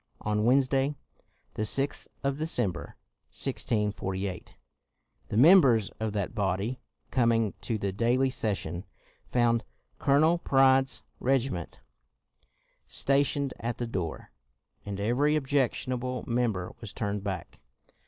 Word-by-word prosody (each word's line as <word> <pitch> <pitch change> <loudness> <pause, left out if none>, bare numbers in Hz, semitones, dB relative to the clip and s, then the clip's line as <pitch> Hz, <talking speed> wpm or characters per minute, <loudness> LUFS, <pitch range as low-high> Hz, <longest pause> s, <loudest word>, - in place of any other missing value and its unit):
On 105 0 0
Wednesday, 135 +2 +3 0.6
the - - -4
6th 135 +6 0 0.2
of 140 +1 -1
December, 120 - -2 0.3
1648, 100 -7 -2 0.7
the 105 - -3
members 130 - +6
of 110 -1 -1
that 100 -3 -2
body, 100 +5 -1 0.3
coming 115 -4 +2
to 115 - -2
the 100 -2 -2
daily 120 +6 +2
session, 95 -8 -2 0.4
found 120 -1 +2 0.4
Colonel 155 +5 +4
Pride's 135 -3 +3 0.2
regi 135 0 +1
ment 85 -2 -6 1.1
stationed 140 0 +1
at 115 0 -3
the 120 - -2
door, 90 -8 -4 0.6
and 100 -1 -4
every 135 +9 +2
ob 145 - -3
jectionable 130 -2 -1
member 115 -7 -1
was 110 -3 -7
turned 105 -2 -3
back. 95 -5 -5
120 Hz, 115 wpm, -28 LUFS, 105-135 Hz, 1.1 s, members